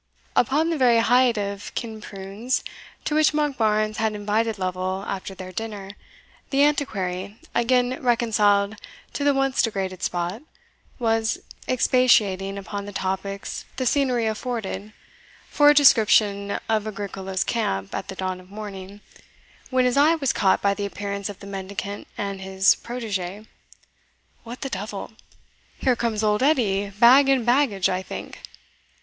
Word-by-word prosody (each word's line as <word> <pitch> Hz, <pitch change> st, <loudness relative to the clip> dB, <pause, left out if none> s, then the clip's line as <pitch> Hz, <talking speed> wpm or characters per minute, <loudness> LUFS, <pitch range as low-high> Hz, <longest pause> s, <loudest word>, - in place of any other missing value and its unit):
Upon 300 Hz, +7 st, +2 dB
the 320 Hz, -, -1 dB
very 245 Hz, -3 st, +5 dB
height 245 Hz, +1 st, +4 dB
of 200 Hz, 0 st, -4 dB
Kinprunes, 215 Hz, +1 st, -4 dB, 0.4 s
to -, -, -1 dB
which 310 Hz, 0 st, +4 dB
Monkbarns 220 Hz, -8 st, +1 dB
had 220 Hz, -1 st, 0 dB
invited 210 Hz, +2 st, 0 dB
Lovel 185 Hz, +1 st, -2 dB
after 195 Hz, 0 st, -5 dB
their 185 Hz, 0 st, -8 dB
dinner, 205 Hz, -1 st, -6 dB, 0.6 s
the 275 Hz, +1 st, +3 dB
Antiquary, 200 Hz, -9 st, -1 dB, 0.2 s
again 250 Hz, +1 st, +1 dB
reconciled 215 Hz, -4 st, +2 dB, 0.4 s
to 285 Hz, -, -3 dB
the 285 Hz, -, +4 dB
once 270 Hz, -1 st, +2 dB
degraded 190 Hz, -4 st, -2 dB
spot, 175 Hz, +5 st, -2 dB, 0.6 s
was 225 Hz, -2 st, +1 dB, 0.3 s
expatiating 210 Hz, -6 st, +3 dB
upon 200 Hz, +1 st, -5 dB
the 205 Hz, -, -7 dB
topics 195 Hz, +1 st, -4 dB
the 255 Hz, -, -2 dB
scenery 250 Hz, -3 st, +2 dB
afforded 215 Hz, -2 st, -3 dB, 0.6 s
for 290 Hz, 0 st, +5 dB
a 295 Hz, -, +6 dB
description 210 Hz, -7 st, +4 dB
of 220 Hz, -1 st, 0 dB
Agricola's 195 Hz, -2 st, -3 dB
camp 95 Hz, -, -2 dB
at -, -, -4 dB
the 190 Hz, -, -6 dB
dawn 185 Hz, -1 st, -3 dB
of 185 Hz, 0 st, -16 dB
morning, 200 Hz, -1 st, -8 dB, 0.7 s
when 255 Hz, -1 st, +2 dB
his 250 Hz, +1 st, +1 dB
eye 305 Hz, +4 st, +5 dB
was 280 Hz, -5 st, 0 dB
caught 190 Hz, -2 st, +2 dB
by 200 Hz, 0 st, +3 dB
the 200 Hz, 0 st, -3 dB
appearance 200 Hz, 0 st, -4 dB
of 200 Hz, -, -9 dB
the -, -, -9 dB
mendicant 200 Hz, +1 st, -6 dB
and 200 Hz, -1 st, -4 dB
his 190 Hz, 0 st, +4 dB
protegee. 210 Hz, -4 st, -5 dB, 1.0 s
"What 235 Hz, +2 st, -9 dB
the 270 Hz, -, -3 dB
devil! 200 Hz, +2 st, -5 dB, 0.7 s
here 255 Hz, -2 st, +2 dB
comes 225 Hz, -2 st, -1 dB
Old 210 Hz, +1 st, +2 dB
Edie, 210 Hz, -9 st, +2 dB
bag 245 Hz, +7 st, +6 dB
and 260 Hz, -4 st, +3 dB
baggage, 240 Hz, -7 st, +3 dB
I 185 Hz, 0 st, -1 dB
think." -, -, -8 dB
210 Hz, 145 wpm, -24 LUFS, 195-245 Hz, 1.0 s, a